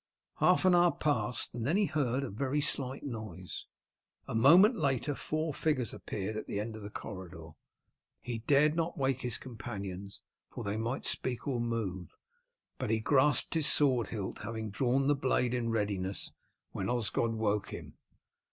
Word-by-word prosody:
Half - - +4
an 185 - +6
hour 175 0 +5
passed, 125 -7 0
and 120 -1 -4
then 155 - +2
he 210 - +3
heard 135 -5 0
a 135 - -4
very 135 +7 -1
slight 135 -2 0
noise. 110 - -6 0.6
A - - -5
moment 170 - +7
later 145 - 0
four 155 +2 -2
figures 130 -7 0
appeared 105 +2 -4
at 110 - -5
the 100 - -2
end 110 +1 -4
of 110 - -8
the 100 - -7
corridor. 95 -6 -8 0.7
He 120 -2 -4
dared 145 +6 +3
not 165 0 -1
wake 135 -2 0
his 120 -2 0
companions, 100 -5 -7 0.3
for - - -7
they 100 +1 -2
might 115 +4 -2
speak 125 +1 0
or 125 -4 0
move, 105 -7 -3 0.6
but 130 - -2
he 110 0 +2
grasped 130 +3 +3
his 160 -3 +3
sword 130 -7 +4
hilt, 105 -4 -5
having 110 -2 -5
drawn 130 +5 +1
the 145 - +4
blade 130 -3 +1
in 120 -2 -1
readiness 100 -4 -1 0.4
when - - -3
Osgod 115 -1 +1
woke 105 -2 0
him. - - -8
120 Hz, 170 wpm, -32 LUFS, 105-140 Hz, 0.7 s, moment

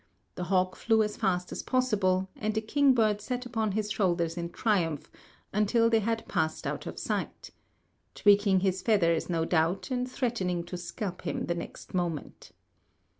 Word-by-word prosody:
The 180 - -4
hawk 185 0 +1
flew 225 -1 +3
as 210 0 -3
fast 180 -4 -1
as - - -4
possible, 200 -8 +1
and 215 0 -2
the 220 - +1
kingbird 225 -4 +3
sat 250 +3 -3
upon 225 -4 -1
his 210 0 -1
shoulders 170 -5 +1
in 170 -1 -4
triumph 170 -7 0 0.4
until 230 +3 +3
they 225 - +5
had 225 +1 -2
passed 160 0 -1
out - - -3
of - - -6
sight," - - -3 0.6
tweaking 200 -2 +4
his 190 -1 0
feathers, 170 -8 +2
no 165 -2 0
doubt, 170 +7 0
and 250 0 -1
threatening 195 -10 -1
to 175 - -7
scalp 180 +2 -5
him - - -3
the 170 - 0
next 170 - -8
moment. 175 -5 -3
195 Hz, 165 wpm, -29 LUFS, 175-225 Hz, 0.6 s, they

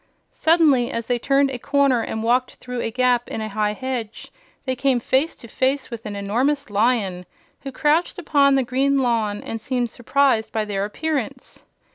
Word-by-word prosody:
Suddenly, 305 -7 +3
as 230 -4 -3
they 245 0 0
turned 275 +2 +2
a 250 - -5
corner 275 -2 +2
and 220 0 -4
walked 250 +2 +1
through 250 -1 -6
a - - -2
gap 245 0 +1
in - - -4
a 215 0 -4
high 210 0 0
hedge, 250 -3 -5 0.3
they 260 -1 -1
came 265 -1 +1
face 265 +7 0
to 235 - -13
face 260 +4 -1
with 225 -2 -7
an 205 - -5
enormous 245 +7 -1
Lion, 205 -4 +1 0.4
which 270 -2 -8
crouched 310 +3 +1
upon 285 -5 +3
the 270 - +2
green 270 +3 +1
lawn 225 -5 0
and 225 -1 -5
seemed 245 -2 -2
surprised 245 -2 +1
by 220 -1 -1
their 200 -1 -2
appearance. 275 +1 -4
250 Hz, 180 wpm, -22 LUFS, 225-275 Hz, 0.4 s, Suddenly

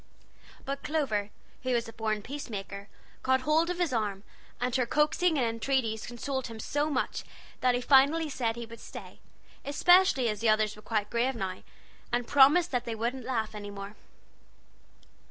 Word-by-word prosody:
But 275 +1 -3
Clover, 240 -10 -1 0.3
who 255 -1 -1
was 235 -1 0
a 225 - -9
born 215 -2 -2
peacemaker, 200 -7 -6 0.3
caught 260 0 +2
hold 310 +5 +2
of 360 - -2
his 345 -6 0
arm, 205 -4 -1 0.4
and 245 0 -1
her 250 -2 +1
coaxings 305 +4 +2
and 255 - +2
entreaties 230 -1 -1
consoled 265 +2 -3
him 225 -2 -9
so 290 +6 -1
much 285 - -1 0.4
that 250 -1 +3
he 245 - -1
finally 285 +5 +5
said 240 -5 -1
he 235 0 -6
would 230 0 -12
stay; - - -10 0.4
especially 355 -2 +4
as 210 -2 -1
the 225 0 +2
others 215 -1 +2
were 210 - -13
quite 215 -1 -2
grave 245 +3 +1
now, 190 -4 -4 0.5
and 240 0 0
promised 285 +6 +6
that 245 -1 -1
they 230 -2 -3
wouldn't 240 +3 -3
laugh 225 -4 -2
any 205 -1 -7
more. 200 +1 -8
245 Hz, 175 wpm, -29 LUFS, 220-275 Hz, 0.5 s, promised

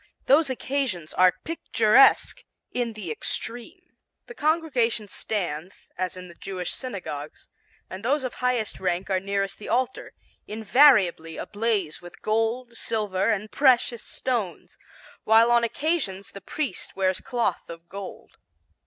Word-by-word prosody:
Those 290 +2 +5
occasions 260 - -2
are 185 -1 +5
picturesque 255 -6 +4 0.3
in 240 -2 -2
the 200 -7 -6
extreme. 240 - -5 0.4
The 475 - -10
congregation 290 - +1
stands, 185 -4 -4
as 185 0 -3
in 180 0 -8
the 170 - -12
Jewish 180 0 -4
synagogues, 155 - -6 0.4
and 190 +2 -8
those 275 +4 +1
of 255 - -3
highest 250 -4 -1
rank 185 +1 -1
are 190 - +2
nearest 195 0 -2
the 210 - -8
altar, 255 +1 -1 0.3
invariably 210 - +4
ablaze 205 -7 -1
with 175 0 -13
gold, 225 +3 0
silver 210 -4 0
and 215 -1 -1
precious 250 -4 +3
stones, 230 -9 -3 0.5
while 225 +2 +5
on 235 0 +4
occasions 235 - -1
the 200 - -10
priest 295 +7 -3
wears 190 -1 +1
cloth 240 -2 -2
of 170 0 -10
gold. 195 +1 -9
215 Hz, 130 wpm, -25 LUFS, 185-250 Hz, 0.5 s, Those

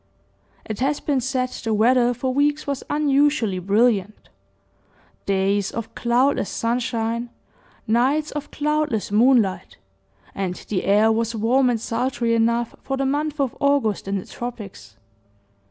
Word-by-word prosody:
It 215 - -5
has 280 +3 0
been 280 -3 0
said 255 0 -1
the 225 -3 -3
weather 240 +3 +4
for 255 +2 -2
weeks 290 +2 +1
was 280 -2 -3
unusually 285 -9 +2
brilliant, 210 +2 +1 1.0
days 195 0 +1
of 230 -1 -6
cloudless 245 0 +1
sunshine, 235 0 -2 0.6
nights 260 +7 +1
of 295 -1 -6
cloudless 300 -8 -1
moonlight, 215 -5 +2 0.6
and 190 -2 -3
the 195 -4 -1
air 210 +3 +4
was 230 +1 -1
warm 250 +4 +2
and 235 -2 0
sultry 235 +1 -1
enough 235 +1 +1
for 270 - -3
the 270 - -1
month 295 +2 -1
of 270 -4 0
August 280 -9 +1
in 195 0 -1
the 185 - -6
tropics. 235 -5 -8
240 Hz, 135 wpm, -22 LUFS, 215-270 Hz, 1.0 s, weather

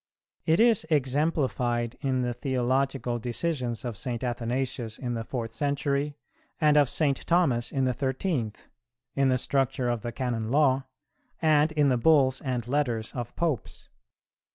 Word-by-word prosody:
It 160 +2 +4
is 230 -4 +4
exemplified 130 -5 0
in 130 -2 0
the 120 0 -1
theological 130 0 -1
decisions 125 -1 -2
of 120 -3 -3
St. 120 +3 -3
Athanasius 120 -1 -2
in 125 -2 -3
the 115 -1 -3
fourth 115 -1 -4
century, 140 +3 -1 0.4
and 150 -3 +4
of 145 -4 +5
St. 140 -4 +1
Thomas 135 -9 +2
in 135 - 0
the 130 -1 +2
thirteenth; 130 - -2 0.5
in 135 -1 +2
the 130 - +3
structure 135 -1 0
of 120 -2 -1
the 120 - -4
Canon 120 -3 -2
Law, 135 -1 +3 0.5
and 155 -1 +3
in 150 -2 +3
the 125 - +2
Bulls 135 -1 +4
and 125 -4 -3
Letters 125 -5 -1
of 120 -2 -5
Popes. 160 -9 -3
130 Hz, 150 wpm, -27 LUFS, 120-145 Hz, 0.5 s, of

